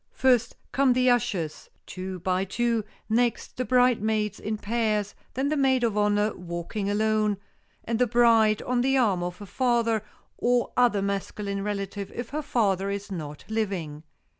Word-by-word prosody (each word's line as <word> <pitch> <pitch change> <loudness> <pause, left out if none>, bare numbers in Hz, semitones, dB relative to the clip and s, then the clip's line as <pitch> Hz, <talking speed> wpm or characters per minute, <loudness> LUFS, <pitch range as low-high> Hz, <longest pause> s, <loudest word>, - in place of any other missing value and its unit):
First, 250 -3 +2 0.2
come 270 -2 +3
the 255 0 +4
ushers, 180 -10 -1 0.2
two 185 0 -6
by 185 0 +1
two, 230 +3 0 0.2
next, 235 +1 0
the 255 - 0
bridesmaids 220 -5 +2
in 215 0 -3
pairs, 210 -2 -1 0.2
then 270 +3 0
the 305 - +1
maid 265 -3 +2
of 225 -3 +1
honor, 210 0 +2
walking 175 +4 -4
alone, 215 0 +1 0.5
and 230 0 -2
the 250 - +4
bride 225 -2 +4
on 250 -1 0
the 270 +2 +2
arm 205 -8 +2
of 175 0 -4
her 205 - -9
father, 235 -1 +1 0.4
or 245 0 +1
other 235 -5 +3
masculine 200 0 -3
relative 200 -1 -4
if 240 -1 -5
her 300 +2 -3
father 200 -9 +1
is 200 0 -4
not 150 -5 -6
living. 190 -9 -3
215 Hz, 160 wpm, -26 LUFS, 200-240 Hz, 0.5 s, the